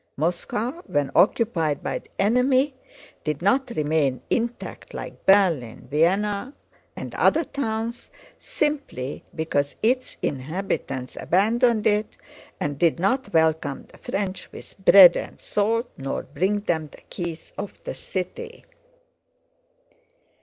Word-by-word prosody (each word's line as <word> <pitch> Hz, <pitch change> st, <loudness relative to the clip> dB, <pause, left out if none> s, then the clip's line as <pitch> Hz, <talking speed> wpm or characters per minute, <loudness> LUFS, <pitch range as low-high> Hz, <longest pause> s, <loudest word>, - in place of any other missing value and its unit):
Moscow 210 Hz, -, -2 dB
when 145 Hz, -2 st, 0 dB
occupied 180 Hz, -8 st, +2 dB
by -, -, -2 dB
the -, -, -24 dB
enemy 255 Hz, +6 st, +3 dB, 0.5 s
did 150 Hz, -2 st, -2 dB
not 260 Hz, +7 st, +2 dB
remain 150 Hz, -3 st, +1 dB
intact 240 Hz, 0 st, -3 dB
like -, -, -8 dB
Berlin, 170 Hz, -, +3 dB
Vienna, 200 Hz, -, +1 dB, 0.4 s
and -, -, -7 dB
other 325 Hz, +2 st, +3 dB
towns, 235 Hz, -4 st, -4 dB, 0.3 s
simply 295 Hz, -, -3 dB
because 145 Hz, -3 st, -1 dB
its 250 Hz, +3 st, +1 dB
inhabitants 135 Hz, -3 st, -3 dB
abandoned 220 Hz, +4 st, +2 dB
it 210 Hz, 0 st, +1 dB, 0.4 s
and 145 Hz, -1 st, -3 dB
did 170 Hz, -1 st, +3 dB
not 255 Hz, +9 st, 0 dB
welcome 160 Hz, -3 st, +1 dB
the -, -, -17 dB
French 195 Hz, -2 st, -4 dB
with -, -, -12 dB
bread 185 Hz, -3 st, +9 dB
and -, -, -5 dB
salt, 225 Hz, +4 st, 0 dB
nor 135 Hz, 0 st, -3 dB
bring 190 Hz, +8 st, -1 dB
them 160 Hz, -6 st, -1 dB
the -, -, -15 dB
keys 170 Hz, -2 st, -6 dB
of 200 Hz, -1 st, -7 dB
the -, -, -4 dB
city. 455 Hz, -, -6 dB
195 Hz, 120 wpm, -24 LUFS, 155-235 Hz, 0.5 s, bread